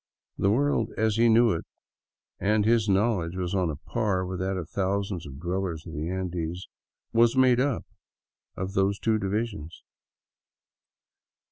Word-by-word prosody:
The 100 - +3
world, 120 -1 +2
as 110 -1 +1
he 115 0 +5
knew 115 +1 +5
it 80 - -2 0.4
— - - -68 0.3
and 105 +1 +2
his 110 -2 +3
knowledge 95 -4 +1
was 90 -1 -3
on 90 -3 +1
a 75 - -3
par 95 +3 -1
with 90 -1 -4
that 95 +1 -1
of 85 -3 -5
thousands 95 -2 -2
of 70 -1 -10
dwellers 90 -1 -3
in 80 - -8
the 80 +1 -3
Andes 90 -1 -3 0.2
— - - -53
was 115 +2 +4
made 130 -2 +5
up 135 -2 0 0.7
of 95 +1 -4
those 100 +1 +2
two 110 0 +1
divisions. 100 -5 -3
95 Hz, 160 wpm, -27 LUFS, 90-110 Hz, 0.7 s, he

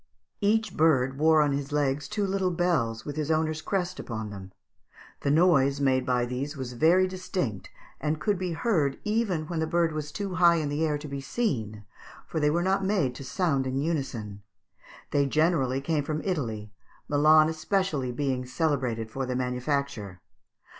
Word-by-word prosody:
Each 215 -1 +1
bird 135 -4 +2
wore 155 0 +5
on 145 - +1
his 140 +1 -3
legs 145 -1 0
two 205 +7 -1
little 190 -1 0
bells 160 -11 0
with 145 0 -6
his 155 -1 -2
owner's 155 0 0
crest 185 -1 -2
upon 110 -3 -5
them; 95 -2 -9 0.7
the - - -1
noise 140 -3 +4
made 130 -2 +2
by 125 -1 +2
these 135 +5 -4
was 130 -2 -5
very 170 +9 +4
distinct, 185 - -4 0.3
and 155 0 -1
could 200 +4 0
be 180 -2 -2
heard 160 - +1
even 210 -7 0
when 165 +1 -3
the 160 - 0
bird 170 0 +2
was 150 -1 -4
too 195 +2 -4
high 170 -1 +5
in 155 -3 -1
the 145 +2 -1
air 150 -2 +1
to 150 +1 -8
be 140 -1 -5
seen, 110 - -2 0.4
for 160 - -3
they 150 -1 +3
were 170 +3 +1
not 195 +1 +1
made 190 -10 +1
to 135 - -9
sound 135 0 0
in 130 +1 -2
unison; 135 -10 -3 0.7
they 140 -1 +2
generally 140 -4 +2
came 150 +1 0
from 155 +1 -3
Italy, 115 - -3 0.4
Milan 155 +2 +5
especially 160 -4 -1
being 130 0 -1
celebrated 125 -5 -1
for 135 +2 -3
their 125 - -2
manufacture. 125 -5 -2
150 Hz, 175 wpm, -27 LUFS, 130-170 Hz, 0.7 s, wore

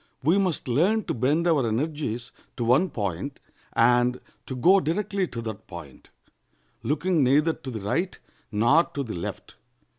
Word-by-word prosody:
We 165 +8 +4
must 185 -9 -1
learn 180 - +2
to - - -3
bend 145 +8 +1
our 145 -8 +3
energies 125 -1 -2 0.3
to 120 - -1
one 130 +11 +3
point, 100 - -4 0.3
and 125 +1 +3 0.3
to 130 - -4
go 180 +11 +5
directly 190 +3 -1
to 115 -5 -6
that 110 -1 -7
point, 85 -7 -11 0.7
looking 155 +2 +1
neither 150 +5 +3
to 130 - -9
the 110 -4 -5
right 170 - -1 0.3
nor 120 +10 +4
to 145 -5 -5
the 115 - -6
left. 85 - -6
135 Hz, 155 wpm, -26 LUFS, 115-170 Hz, 0.7 s, go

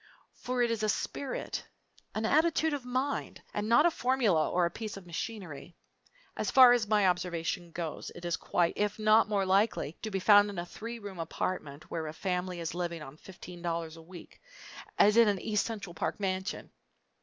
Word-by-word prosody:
For 250 -1 -1
it 235 - +1
is 225 -1 -1
a 215 - +1
spirit, 270 +5 -3 0.5
an 215 +1 -1
attitude 315 +3 +3
of 285 -3 -3
mind, 260 +3 -2
and 210 +1 -2
not 295 +7 +6
a 345 - +5
formula 240 - +2
or 180 0 +2
a 170 - -1
piece 215 -3 -6
of 195 - -11
machinery. 175 -3 -6 0.6
As - - -2
far 255 -2 +8
as 235 -3 +1
my 210 -2 +3
observation 175 -1 -1
goes 165 -2 -5
it 175 - -9
is 170 -1 0
quite, 170 -1 0
if 210 0 0
not 215 0 +4
more 200 -2 +1
likely, 190 -5 +1
to 220 - -4
be 195 - -2
found 205 +1 +6
in 200 - -7
a 175 - -3
three 230 +6 -7
room 200 -5 -9
apartment, 160 -3 -4
where 160 -2 -3
a 155 - -6
family 180 0 -2
is 165 -2 -4
living 170 -2 -3
on 135 0 -10
fifteen 180 +1 -11
dollars 165 -2 -3
a 165 - -12
week, 175 +1 -13 0.6
as 210 +2 +5
in 230 -1 +7
an 200 -2 +1
East 210 +1 0
Central 215 -5 -6
Park 160 - -3
mansion! 190 0 -3
195 Hz, 195 wpm, -30 LUFS, 175-220 Hz, 0.6 s, far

